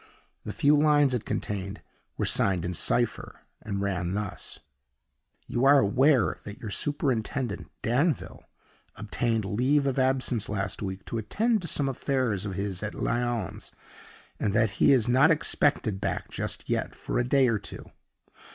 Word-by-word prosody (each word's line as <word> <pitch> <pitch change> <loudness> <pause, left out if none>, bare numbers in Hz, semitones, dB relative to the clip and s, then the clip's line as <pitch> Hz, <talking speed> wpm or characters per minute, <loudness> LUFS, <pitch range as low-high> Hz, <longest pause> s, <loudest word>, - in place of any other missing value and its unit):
The - - -4
few 145 +1 +3
lines 145 -2 +4
it 120 - -2
contained 100 0 -4 0.3
were - - 0
signed 90 -3 +1
in 90 - -2
cipher, 120 +6 0 0.2
and 100 -2 -4
ran 90 -2 -2
thus: 105 -2 -5 0.9
"You 120 - -2
are 140 +1 +7
aware 130 +1 +3
that 100 0 -8
your 110 - -7
superintendent, 130 -3 -2
Danville, 140 +6 0 0.5
obtained 110 +1 -1
leave 130 +8 +1
of 135 -1 0
absence 130 -4 +1
last 100 -1 -3
week 95 -1 -5
to 115 - -3
attend 220 - 0
to 170 - -5
some 145 -3 +1
affairs 130 -6 -1
of 95 -2 -4
his 100 -2 -3
at 105 -1 -4
Lyons, 120 -5 -2 0.7
and 100 - -1
that 110 -2 +3
he - - +6
is 125 -5 +4
not 130 +5 +5
expected 145 -9 +1
back - - -3
just - - -4
yet - - -2
for - - -3
a - - +2
day 130 +1 +3
or 115 -3 +1
two. - - -10
120 Hz, 155 wpm, -27 LUFS, 100-135 Hz, 0.9 s, are